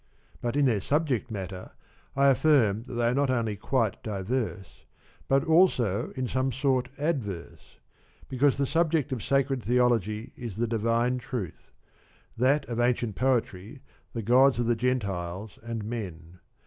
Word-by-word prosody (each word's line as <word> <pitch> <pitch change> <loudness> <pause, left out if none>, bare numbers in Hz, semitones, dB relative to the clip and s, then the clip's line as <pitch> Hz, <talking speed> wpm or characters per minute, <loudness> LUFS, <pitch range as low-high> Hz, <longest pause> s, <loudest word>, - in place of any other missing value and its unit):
But 120 +2 -2
in 145 -1 +3
their 110 -6 +2
subject 140 - 0
matter 95 -3 -6 0.4
I 140 +1 +5
affirm 130 -7 +3
that 130 - -9
they 120 0 +1
are - - +1
not 140 +1 +1
only 115 -4 0
quite 110 0 -1
diverse, 105 -2 -4 0.4
but 135 0 +3
also 155 - +3
in 130 -1 -2
some 130 +2 0
sort 130 -2 0
adverse; 105 - -4 0.5
because 135 +2 +2
the 140 - +1
subject 160 -1 +1
of 125 -4 -2
sacred 135 0 +1
Theology 115 -3 +1
is 115 -6 -7
the 115 +3 0
divine 115 +2 0
truth, 115 -8 -6 0.6
that 135 +5 +2
of 120 -1 -4
ancient 120 -3 +1
Poetry 125 0 -1 0.3
the 115 - -4
gods 130 +4 +5
of 120 - 0
the 120 0 +2
Gentiles 100 -5 -2
and 115 -1 -5
men. 90 -7 -6
120 Hz, 150 wpm, -27 LUFS, 105-135 Hz, 0.6 s, I